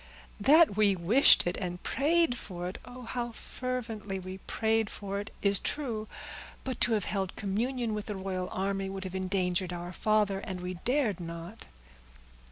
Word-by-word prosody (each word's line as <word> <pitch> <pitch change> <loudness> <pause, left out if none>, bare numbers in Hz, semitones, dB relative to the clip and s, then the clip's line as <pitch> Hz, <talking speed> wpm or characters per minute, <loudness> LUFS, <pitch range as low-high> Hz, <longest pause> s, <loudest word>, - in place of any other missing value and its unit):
"That 290 +2 +6
we 205 -2 +4
wished 200 +11 +6
it, 175 - -1
and 180 -2 -4
prayed 320 -1 +2
for 180 -6 -6
it,—oh, 250 +7 -9
how 240 0 -3
fervently 225 -6 0
we 185 0 -7
prayed 220 +2 0
for 200 0 -4
it!—is 200 -1 0
true; 230 -7 -2 0.6
but 260 -3 -4
to 235 - +4
have 210 -4 +1
held 195 -2 -2
communion 230 +3 -1
with 210 -1 -4
the 210 - -3
royal 190 -1 -3
army 195 0 -1
would 190 0 -5
have 185 -1 -6
endangered 185 -1 0
our 175 0 -5
father, 210 -1 +2
and 190 -1 -5
we 180 +1 -4
dared 250 - +1
not." 170 +4 -8
200 Hz, 160 wpm, -30 LUFS, 185-230 Hz, 0.6 s, That